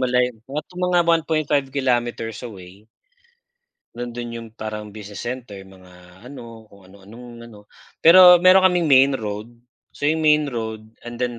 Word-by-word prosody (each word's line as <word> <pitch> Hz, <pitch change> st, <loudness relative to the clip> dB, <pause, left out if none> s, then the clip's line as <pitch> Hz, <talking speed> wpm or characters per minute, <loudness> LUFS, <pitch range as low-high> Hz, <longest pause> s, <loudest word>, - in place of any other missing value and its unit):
malayo, 125 Hz, -1 st, 0 dB, 0.2 s
nasa 150 Hz, +5 st, -7 dB
mga 180 Hz, -1 st, +1 dB
1.5 155 Hz, -4 st, 0 dB
kilometers 120 Hz, -4 st, -2 dB
away 100 Hz, -2 st, -12 dB, 1.1 s
nandun 120 Hz, 0 st, -7 dB
'yung 115 Hz, -1 st, -8 dB
parang 105 Hz, -1 st, -7 dB
business 105 Hz, -1 st, -10 dB
center, 120 Hz, -5 st, -7 dB
mga 90 Hz, +1 st, -18 dB
ano 115 Hz, -4 st, -12 dB
kung 100 Hz, -2 st, -20 dB
ano-anong 115 Hz, +4 st, -14 dB
ano, 105 Hz, -2 st, -17 dB, 0.3 s
pero 180 Hz, +1 st, +8 dB
meron 185 Hz, +1 st, +6 dB
kaming 175 Hz, -4 st, 0 dB
main 135 Hz, +1 st, +5 dB
road, 110 Hz, 0 st, -6 dB, 0.4 s
so, -, -, -17 dB
'yung 155 Hz, +2 st, +1 dB
main 150 Hz, -2 st, +2 dB
road 110 Hz, -3 st, -6 dB, 0.2 s
and 120 Hz, -, -7 dB
then 120 Hz, 0 st, -4 dB
120 Hz, 140 wpm, -21 LUFS, 105-145 Hz, 1.1 s, pero